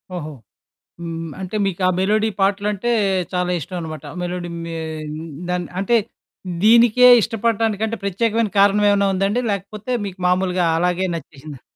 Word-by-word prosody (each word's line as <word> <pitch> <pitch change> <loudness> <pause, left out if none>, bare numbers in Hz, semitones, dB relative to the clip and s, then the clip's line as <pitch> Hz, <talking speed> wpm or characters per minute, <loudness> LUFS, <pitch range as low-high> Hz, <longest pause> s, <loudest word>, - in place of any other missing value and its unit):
ఓహో! 155 -3 -5 0.7
హ్మ్, 165 -1 -5
అంటే, 190 +2 -5
మీకు 195 -1 -3
ఆ - - +4
మెలోడీ 215 +3 +2
పాటలంటే 205 +3 0 0.4
చాలా 180 0 0
ఇష్టవనమాట. 160 -2 -6 0.2
మెలోడి 175 0 -4
మే 165 0 -6 0.7
దాన్ 180 0 -1
అంటే, 200 +5 +2 0.7
దీనికే 235 +2 +6
ఇష్టపడటానికంటే 225 0 -1
ప్రత్యేకమైన 215 +2 0
కారణవేవన్నా 200 0 +4
ఉందండి, 200 +5 0
లేకపోతే 205 +4 -5
మీకు 190 -1 -7
మాములుగా 180 -1 +1
అలాగే 180 +2 +1
నచ్చేసిందా? 150 -3 -10
195 Hz, 115 wpm, -20 LUFS, 180-215 Hz, 0.7 s, దీనికే